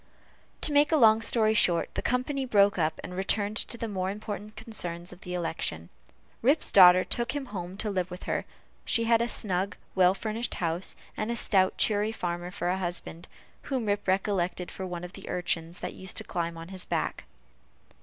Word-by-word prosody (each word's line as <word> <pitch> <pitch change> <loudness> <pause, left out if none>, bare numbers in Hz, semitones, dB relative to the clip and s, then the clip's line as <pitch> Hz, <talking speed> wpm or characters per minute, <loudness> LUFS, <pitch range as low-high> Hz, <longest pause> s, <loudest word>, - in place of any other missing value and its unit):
To 300 - +6
make 290 +2 +4
a 315 - +4
long 220 -4 +6
story 220 -1 +3
short, 175 -5 +3
the - - -2
company 255 +3 -1
broke 205 -6 +3
up, 155 -1 0
and 180 - -7
returned 205 +2 0
to 235 - -2
the 230 - -3
more 190 -3 -2
important 210 +1 -6
concerns 175 -6 -4
of 180 - -16
the 180 0 -5
election. 125 - -3 0.5
Rip's 280 +7 +4
daughter 185 -1 +8
took 235 +1 -1
him 290 -2 -3
home 180 0 -5
to 215 0 -2
live 185 -2 -1
with 180 0 -9
her; - - -2 0.4
she 230 - +2
had 230 0 +3
a 235 - +1
snug, 190 -3 -1 0.2
well 185 0 +4
furnished 225 +3 -3
house, 170 +1 -2 0.2
and 215 - -3
a 235 - -1
stout 190 -5 +2
cheery 210 0 +2
farmer 175 -4 -4
for 180 -1 -3
a 185 +1 0
husband, 175 -1 -5 0.4
whom 260 -5 -1
Rip 205 -1 -1
recollected 185 -2 0
for 190 - -5
one 175 -1 -6
of 180 +1 -8
the 195 - -10
urchins 170 -1 -2
that 180 - -4
used 190 -1 -7
to - - -3
climb 170 -1 -3
upon 165 +1 -9
his 190 -1 -4
back. - - -3
190 Hz, 195 wpm, -28 LUFS, 180-220 Hz, 0.5 s, daughter